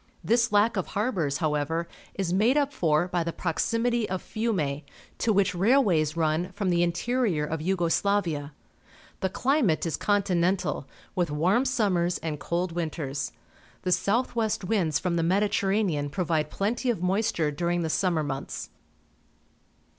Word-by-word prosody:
This 235 +1 +2
lack 210 +2 +3
of 185 - -1
harbours, 185 - -1
however, 155 +3 -1 0.3
is 185 -3 -1
made 225 +9 +3
up 285 -1 +1
for 160 - +2
by 175 -2 0
the 170 - -2
proximity 230 +7 0
of 185 0 -1
Fiume, 175 -11 -1 0.4
to 230 - +2
which 200 -1 +2
railways 180 - +3
run 160 +3 0
from 200 -2 -1
the 170 0 +2
interior 175 -1 0
of 155 +1 -3
Yugo 175 0 0
Slavia. 165 -6 0 0.7
The 190 - 0
climate 245 - +1
is 165 - -1
continental, 185 -6 +1 0.3
with 180 -4 0
warm 180 - +2
summers 195 -9 +1
and 155 -3 -4
cold 175 +3 -1
winters. 155 -5 -3 0.5
The 180 - 0
south 230 +8 +1
west 220 -3 0
winds 180 -7 +1
from 170 +1 -1
the - - +2
Mediterranean 190 -3 +1
provide 160 -2 -1
plenty 230 - -1
of 215 -7 -1
moisture 185 -4 +1
during 170 +3 -1
the - - -1
summer 170 -4 +1
months. 135 -2 -5
180 Hz, 145 wpm, -27 LUFS, 160-210 Hz, 0.7 s, lack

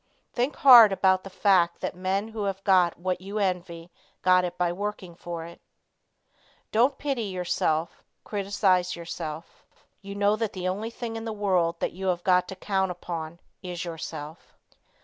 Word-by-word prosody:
Think 255 +4 -1
hard 240 -6 +9
about 190 -1 +2
the 195 - -8
fact 185 -3 +2
that - - -3
men 190 +4 -2
who 220 -2 -4
have 195 -1 -3
got 185 -4 +3
what 180 +1 -2
you 200 +3 -6
envy 180 -3 -2 0.3
got 185 0 +5
it 180 0 -4
by 175 -1 0
working 195 -2 -5
for 170 -1 -7
it. 170 0 -13 1.1
Don't 250 +5 +3
pity 270 -6 -2
yourself, 175 -4 -1 0.2
criticise 195 -3 0
yourself. 165 -2 -7 0.4
You 200 0 -8
know 205 +1 +2
that 225 -2 -2
the 185 -1 -3
only 205 +5 -2
thing 230 -1 -6
in 225 - -6
the 225 - -3
world 185 -5 0
that - - -1
you 190 +2 -5
have 175 -1 0
got 180 -1 +3
to 190 - -7
count 190 -1 -1
upon 170 -2 -6 0.2
is 180 -1 -5
yourself. 160 -2 -8
185 Hz, 170 wpm, -26 LUFS, 175-205 Hz, 1.1 s, hard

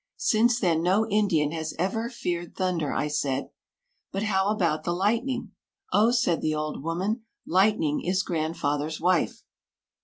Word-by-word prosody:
Since 235 +2 +3
then 170 -6 +2
no 195 +6 +2
Indian 195 -8 +2
has 160 -1 -4
ever 225 +6 -1
feared 175 -8 -4
thunder." 180 -6 -1
I 150 - 0
said, 140 -2 -1 0.6
"But 195 +2 -2
how 190 -2 +1
about 170 -7 +1
the 175 - -1
lightning?" 235 +8 0 0.4
"Oh," 215 +3 +5
said 235 -9 +2
the 155 0 0
old 150 -2 -3
woman, 190 - -2 0.2
"lightning 185 -5 +2
is 185 +2 +1
grandfather's 155 -3 -2
wife." 180 0 +1
180 Hz, 145 wpm, -26 LUFS, 155-210 Hz, 0.6 s, Oh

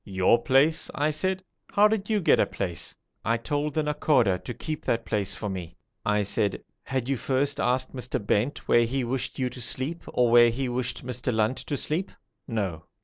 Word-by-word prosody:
'Your 95 +3 +3
place!' 140 +5 +3
I 150 +1 +1
said. 185 +5 -1 0.3
'How 205 +1 +6
did 210 -1 -2
you 215 -2 +2
get - - +4
a - - +3
place?' 90 -5 -4 0.3
'I 115 +1 +1
told 145 +4 -2
the 155 - +2
Nakhoda 135 -10 +2
to - - -5
keep 155 +5 -5
that 115 0 0
place 100 -1 -1
for 105 - -4
me.' 90 -3 -6 0.3
I 105 -1 +2
said, 100 0 0 0.2
'Had 130 -2 -3
you 135 - +1
first 135 +3 0
asked 130 +1 +1
Mr. 125 -1 -2
Bent 105 +6 -1
where 120 0 +5
he 130 +3 -1
wished 125 +2 -2
you 130 - 0
to 125 - -8
sleep 130 +7 -2
or 120 -2 +2
where 120 0 +8
he 130 +3 -2
wished 125 0 -2
Mr. 125 0 -2
Lunt 110 +2 +1
to 145 - -3
sleep?' 165 +8 -2 0.4
'No.' 95 - -2
125 Hz, 200 wpm, -26 LUFS, 110-145 Hz, 0.4 s, where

